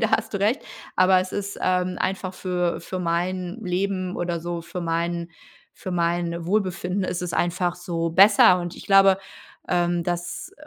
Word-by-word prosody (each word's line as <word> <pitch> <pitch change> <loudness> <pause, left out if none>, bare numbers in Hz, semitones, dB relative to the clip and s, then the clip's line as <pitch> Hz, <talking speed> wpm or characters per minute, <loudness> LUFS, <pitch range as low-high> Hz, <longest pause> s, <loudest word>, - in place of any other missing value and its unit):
da 225 - +1
hast 220 0 +1
du - - 0
recht. 220 +6 +1 0.3
Aber 185 0 +5
es 185 - -5
ist, 200 0 -4
ähm, 180 0 0
einfach 185 0 -2
für 180 -2 -1
für 185 - -5
mein 180 +1 -2
Leben 185 0 -2
oder 175 -1 -2
so 170 0 -4
für 180 +1 -6
mein 170 +1 -2 0.4
für 185 - -7
mein 170 -1 -1
Wohlbefinden 190 -1 0
ist 180 0 -3
es 175 - -3
einfach 175 0 0
so 170 -2 -2
besser. 190 0 +7
Und 175 0 -5
ich - - -10
glaube, 195 -1 +6 0.5
ähm, 175 -1 +1
dass 175 - -4
180 Hz, 170 wpm, -24 LUFS, 175-185 Hz, 0.5 s, besser